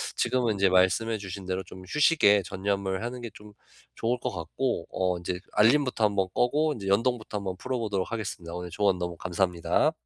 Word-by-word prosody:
지금은 120 -4 +1
이제 100 -1 +3
말씀해 95 +5 +3
주신 95 -1 -7
대로 95 +1 -2
좀 95 0 -12
휴식에 145 - +4
전념을 95 +2 -2
하는 125 +1 -5
게 120 - -5
좀 105 0 -14 0.4
좋을 120 +2 0
것 - - -2
같고 85 - -3
어 90 -1 0
이제 90 +1 -3
알림부터 120 +1 +4
한번 100 -2 +1
끄고 150 +5 +2
이제 100 -5 -6
연동부터 110 +1 +1
한번 95 -2 -3
풀어 130 +5 -3
보도록 105 -4 -2
하겠습니다. 95 -7 -5
오늘 90 0 -5
조언 95 +1 +1
너무 85 -1 -3
감사합니다. 90 -1 +1
100 Hz, 405 characters per minute, -27 LUFS, 95-115 Hz, 0.4 s, 휴식에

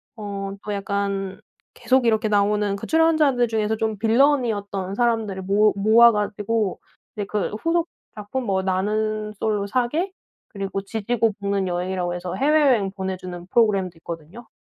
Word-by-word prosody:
어 200 -3 -5
또 210 - -3
약간 200 -1 -2 0.4
계속 255 -1 +2
이렇게 220 -1 +2
나오는 205 0 +2
그 200 - -7
출연자들 310 -6 +3
중에서 220 -1 -1
좀 220 -2 -2
빌런이었던 220 -6 +1
사람들을 225 -5 0
모 205 +3 +3
모아 220 +4 +6
가지고 210 -1 -1 0.4
이제 205 -2 -3
그 205 -1 -2
후속 335 0 +1 0.3
작품 215 +5 -4
뭐 190 -3 0
'나는 210 +3 -1
솔로 210 -2 0
사계' 255 - 0 0.4
그리고 195 -1 -4
'지지고 220 +2 -1
볶는 200 -1 0
여행'이라고 180 0 -2
해서 175 0 -5
해외여행 270 -7 +3
보내주는 185 -2 -5
프로그램도 195 -5 +2
있거든요. 170 +8 -9
210 Hz, 335 characters per minute, -23 LUFS, 195-230 Hz, 0.4 s, 모아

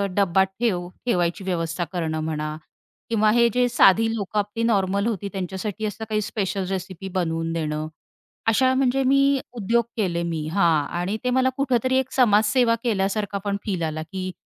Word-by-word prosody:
डब्बा 190 -1 +3
ठेव 190 -2 -2 0.2
ठेवायची 175 -4 0
व्यवस्था 170 -2 -2
करणं 160 -3 -2
म्हणा 155 -1 -3 0.5
किंवा 215 -2 +3
हे 235 0 +5
जे 250 0 +3
साधी 225 0 +4
लोकं 210 -1 -2
आपली 205 +3 -2
नॉर्मल 200 -2 +1
होती 200 -3 -2
त्यांच्यासाठी 195 +3 -4
असं 215 +1 -4
काही 215 -1 0
स्पेशल 195 -2 -2
रेसिपी 190 0 -5
बनवून 165 -3 -1
देणं. 155 -1 -2 0.6
अशा 255 +4 +4
म्हणजे 265 0 +2
मी 275 +1 +3
उद्योग 235 +1 +1
केले 175 -6 0
मी 165 -3 -3
हां 165 -6 +3
आणि 190 +5 -1
ते 250 - +1
मला 260 +1 +3
कुठेतरी 260 -1 +1
एक 265 -1 -1
समाजसेवा 230 0 +4
केल्यासारखा 200 -2 0
पण 200 -1 0
फील 185 -5 -2
आला, 155 -1 -2
की 185 +3 -5
200 Hz, 160 wpm, -23 LUFS, 175-230 Hz, 0.6 s, हे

